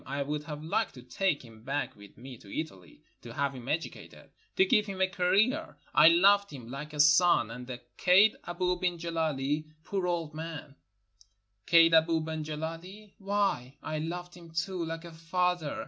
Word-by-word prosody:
I 140 +1 -2
would 150 +1 -4
have 150 -1 -7
liked 160 - -1
to 125 - -11
take 155 -1 -1
him 110 -1 -15
back 140 +3 -3
with 100 -1 -16
me 130 +1 -10
to - - -17
Italy, 95 - -8 0.2
to 115 -1 -10
have 140 -1 0
him 125 -2 -10
educated, 160 +4 -5 0.2
to 375 - +5
give 215 - +3
him 195 -1 -6
a 190 - +5
career. 205 - +1 0.2
I 150 - +7
loved 200 +4 +5
him 125 -5 -9
like 150 +3 -6
a 150 - -7
son. 150 -5 +5
And 125 +1 -8
the 125 -1 -7 0.2
kaid, 195 +4 +5
Abou 180 +1 -1
ben 180 -1 0
Gileli, 155 -3 -1 0.2
poor 190 -1 -2
old 165 -3 -2
man. 155 -2 -7 0.9
Kaid 165 -1 +6
Abou 160 0 +4
ben 160 0 -4
Gileli? 165 +7 -7
Why, 195 -10 -1
I 155 -1 -3
loved 175 +3 -5
him 170 -2 -13
too, 165 +1 -3
Kke 165 +1 -5
a 170 - -9
father. 165 -1 -1
165 Hz, 180 wpm, -30 LUFS, 145-180 Hz, 0.9 s, I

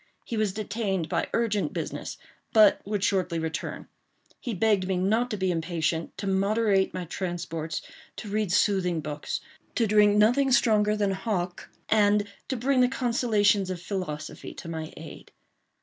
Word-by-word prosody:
He 235 - -4
was 215 -3 +1
detained 200 -4 -2
by - - 0
urgent 210 -8 0
business—but 215 -3 +1
would 205 -1 -2
shortly 185 -4 +1
return. 160 +1 -4 0.5
He 240 -4 -4
begged 200 -2 +2
me 190 -1 0
not 220 +7 +1
to 215 - -3
be 190 -1 +1
impatient—to 165 +2 -2
moderate 195 +1 +2
my 180 -1 -5
transports—to 170 +3 -5
read 210 -2 -1
soothing 180 -4 +2
books—to 150 +9 -4
drink 210 -1 +4
nothing 250 +6 +4
stronger 215 -3 +3
than 205 -2 +1
Hock—and 205 +2 0 0.2
to 260 - -2
bring 255 +2 +2
the 250 - +5
consolations 225 -6 +2
of 185 -2 -3
philosophy 170 -5 -5
to - - -9
my 160 -1 -5
aid. 160 0 -10
200 Hz, 135 wpm, -27 LUFS, 175-215 Hz, 0.5 s, the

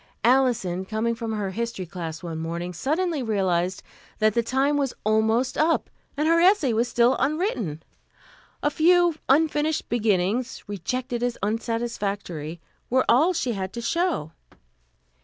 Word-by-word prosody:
Alison, 235 -8 +2
coming 220 +4 -1
from 230 -1 -4
her 205 -3 -2
history 230 -3 -3
class 165 -2 -6
one 165 -2 -5
morning, 170 +2 -4
suddenly 310 - -1
realized 190 -5 0 0.3
that 215 -1 +3
the 235 - +2
time 265 +5 +1
was 280 -3 -1
almost 220 +4 +1
up, 325 +1 +2 0.3
and 300 +2 +1
her 335 +1 +4
essay 355 - +4
was 230 +2 +1
still 240 +1 +3
unwritten. 260 - -1 0.8
A 295 - +2
few 345 +2 +4 0.2
unfinished 300 +1 +2
beginnings, 220 +1 0
rejected 240 +5 -3
as 245 -1 -1
unsatisfactory, 205 -7 -3 0.3
were 260 +1 +2
all 295 +10 +5
she 260 -8 -1
had 190 -3 -3
to 235 - -5
show. 335 - -1
235 Hz, 140 wpm, -25 LUFS, 195-275 Hz, 0.8 s, all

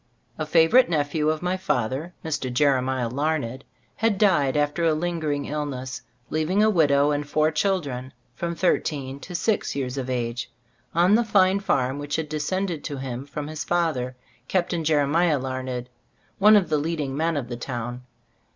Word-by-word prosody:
A 155 - -2
favorite 165 +10 +5
nephew 150 -1 +1
of 155 +1 -1
my 180 +1 0
father, 135 0 -1
Mr. 145 -5 -2
Jeremiah 130 -2 +2
Lamed, 135 -1 -2 0.3
had 225 -2 +1
died 150 -9 +3
after 145 +3 0
a 160 -2 +3
lingering 155 -3 -2
illness, 140 -4 -4 0.3
leaving 160 +7 +2
a 215 - +4
widow 145 -5 +4
and 145 0 -2
four 155 +1 +2
children, 145 -8 -1 0.2
from 170 +6 -3
thir 180 - +3
teen 140 -3 -5
to 180 +4 -8
six 210 -2 0
years 135 -1 -2
of 130 -1 -4
age, 120 -1 -2 0.5
on 175 +4 +4
the 235 +2 +5
fine 195 -3 +3
farm 135 -8 0
which 145 0 -3
had 160 -2 -2
descended 165 +2 -2
to 145 - -4
him 130 0 -5
from 145 +1 -5
his 155 0 -5
father, 155 -8 0 0.3
Captain 175 -2 0
Jeremiah 155 +1 +3
Larned, 130 -2 -4 0.5
one 210 +2 +7
of 200 -4 +3
the 155 -1 +2
leading 150 -3 -2
men 160 +1 0
of 130 -4 -3
the 120 - -5
town. 120 0 -5
150 Hz, 170 wpm, -24 LUFS, 130-170 Hz, 0.5 s, one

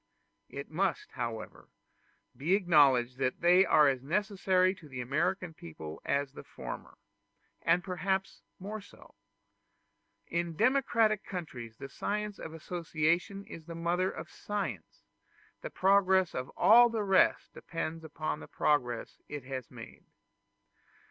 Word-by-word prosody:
It 140 +2 -7
must, 185 +3 -1
however, 115 -2 -6 0.7
be 160 +8 +2
acknowledged 140 -9 +4
that 130 -1 -1
they 180 +2 +6
are 150 -1 +6
as 135 -2 +1
necessary 185 +3 +1
to 160 -6 -15
the 130 -2 -7
American 165 +7 -1
people 80 - -9
as 140 -1 -1
the - - -9
former, - - -8 0.6
and 175 +2 +3
perhaps 190 +1 -2 0.2
more 205 +3 -6
so. 205 - -17 1.1
In 170 -1 -2
democratic 230 - +3
countries 125 - -7
the 135 - -7
science 210 +7 -3
of 160 - -7
association 170 +3 -1
is 160 - -10
the 165 - -7
mother 175 +3 0
of - - -7
science; 100 - -5 0.6
the - - -5
progress 190 -1 +3
of 125 0 -4
all 240 +3 +7
the 225 -2 -1
rest 195 -2 +3
depends 165 -1 -5
upon 155 -1 -4
the - - -10
progress 125 -6 0
it 145 -3 -6
has 130 -1 -6
made. - - -11
170 Hz, 130 wpm, -31 LUFS, 135-190 Hz, 1.1 s, all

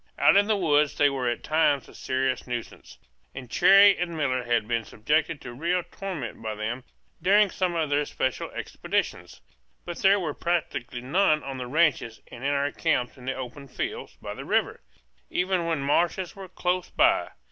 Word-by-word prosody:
Out - - +5
in 200 +1 +5
the 215 -1 +2
woods 150 -5 +2
they 145 -1 +4
were 130 -3 -1
at 120 - -3
times 150 -4 +2
a - - -15
serious 130 0 -2
nuisance, 120 -2 -7 0.4
and 130 -2 -8
Cherrie 195 +5 +7
and 170 -2 -3
Miller 130 -4 0
had 120 -3 +1
been 115 -1 0
subjected 150 +8 -1
to 120 - -8
real 170 +7 0
torment 175 - -6
by 110 -1 -4
them 110 +4 -4 0.4
during 200 +3 +4
some 180 -2 -1
of 155 -3 -1
their 145 +1 +2
special 130 -5 -2
expeditions; - - -3 0.4
but 175 -1 -6
there 195 +1 +5
were 160 -5 -3
practically 150 -8 -2
none 155 +3 +2
on 135 -1 -6
the 125 - -5
ranches 135 -6 +1
and 120 +1 -10
in 140 - +1
our 140 0 0
camps 135 -7 0
in 125 -2 -13
the 135 - -2
open 130 +2 -7
fields 425 - -5
by - - -6
the - - -8
river, - - 0 0.5
even 180 -2 0
when 160 -4 0
marshes 170 +5 0
were 195 -2 -9
close 180 0 -1
by. 335 +2 +3
150 Hz, 185 wpm, -26 LUFS, 130-180 Hz, 0.5 s, Cherrie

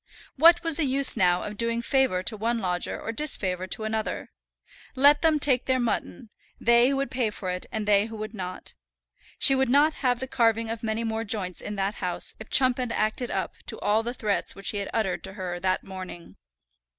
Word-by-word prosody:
What 335 +4 +6
was 330 -3 -1
the 320 - +1
use 270 0 +4
now 180 -4 +2
of 210 0 -7
doing 230 +1 -1
favour 260 -9 +1
to 220 - +1
one 230 +3 -1
lodger 180 -4 -3
or 225 - -5
disfavour 190 -9 -1
to 215 - -3
another? 220 0 -3 0.6
Let 285 +2 +5
them 315 -2 +3
take 260 -4 +2
their 260 -1 +2
mutton, 235 -1 -3 0.3
they 235 +2 +5
who 275 - 0
would 275 0 -2
pay 250 -4 0
for 190 -3 -5
it 180 0 -5
and 215 -2 -3
they 205 0 +4
who 225 - -9
would 215 0 -6
not. 185 -3 -7 0.6
She 270 - +6
would 265 -1 +1
not 290 +4 +4
have 245 -2 +1
the 260 - -3
carving 230 -2 +1
of 230 -1 -5
many 225 0 -2
more 225 0 -2
joints 200 -5 -1
in 210 - -6
that 195 +1 -1
house 180 -2 0
if 220 - -10
Chumpend 255 -2 +3
acted 220 +3 -1
up - - -3
to - - -4
all 210 +2 +1
the 240 +2 -5
threats 210 -4 -1
which 195 - -3
he 205 - -5
had 200 - -4
uttered 190 -7 -1
to 190 - -9
her 180 -3 -5
that 185 +1 -1
morning. 185 - -9
225 Hz, 210 wpm, -26 LUFS, 195-255 Hz, 0.6 s, What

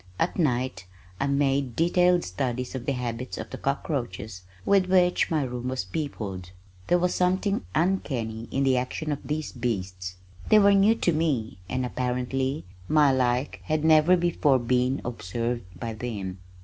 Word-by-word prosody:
At 175 - -1
night 125 - 0 0.3
I 140 - +1
made 140 -3 +1
detailed 175 +1 +3
studies 125 +6 -3
of 130 -2 -6
the 140 - +2
habits 125 0 -4
of - - -7
the - - -6
cockroaches 120 - -3 0.2
with 195 -2 +4
which 180 -1 +3
my 155 -3 +1
room 125 -1 -4
was 130 -7 -2
peopled. 95 - -5 0.4
There 175 - +4
was 180 0 +1
something 185 - +1
uncanny 120 -11 -1
in 135 - 0
the 130 -1 +3
action 140 +5 -2
of 145 - -2
these 150 0 -3
beasts. 95 -7 -3 0.3
They 215 - +7
were 200 -1 +6
new 200 +3 +5
to 180 - +1
me 135 - -1
and 130 0 -1
apparently 125 +2 -2 0.2
my 150 -2 +5
like 125 +1 0
had 155 0 0
never 160 +3 +6
before 165 -5 +2
been 125 +2 +1
observed 115 0 -3
by 115 +3 -4
them. 105 -5 -5
130 Hz, 160 wpm, -26 LUFS, 120-155 Hz, 0.4 s, They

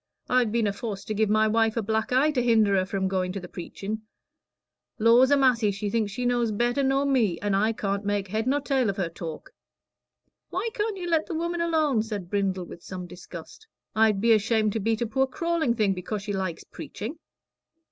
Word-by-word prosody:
"I've 250 -3 +2
been 230 -1 +1
aforced 200 0 -4
to - - 0
give 215 0 +1
my 215 +1 +4
wife 225 +1 +2
a 230 - 0
black 220 +2 -1
eye 270 +5 +4
to 260 -4 0
hinder 220 -4 +4
her 185 -1 +1
from 195 -1 -1
going 185 -1 -1
to 200 - -4
the 180 - -9
preachin'. 200 +5 -6 1.0
Lors 235 +4 +5
a 285 - +5
massy, 245 -5 +3
she 200 +1 -3
thinks 215 -2 0
she 245 +4 -3
knows 240 -2 +1
better 240 +6 +1
nor 270 +1 +2
me, 235 -11 +2
and 205 -1 0
I 215 +3 +2
can't 200 -2 -2
make 205 -1 -1
head 220 +4 -1
nor 285 +2 +2
tail 265 -5 +1
of 195 - -3
her 180 -4 -1
talk." 165 -1 -8 1.0
"Why 390 +6 -2
can't 425 -3 -2
you 355 -1 -5
let 325 -2 +1
the 335 - -4
woman 340 +1 -2
alone?" 310 -8 +2
said 210 -5 -5
Brindle, 190 -3 0
with 170 - -11
some 180 -1 -7
disgust. 175 - -11 0.3
"I'd 215 -2 +3
be 230 +2 +5
ashamed 215 0 +2
to 225 - -1
beat 225 +2 0
a - - 0
poor 265 +4 +1
crawling 330 -3 0
thing 210 -4 +2
'cause 205 +2 -4
she 205 -1 -3
likes 190 -4 -3
preaching." 275 +10 -7
220 Hz, 210 wpm, -26 LUFS, 200-255 Hz, 1.0 s, Lors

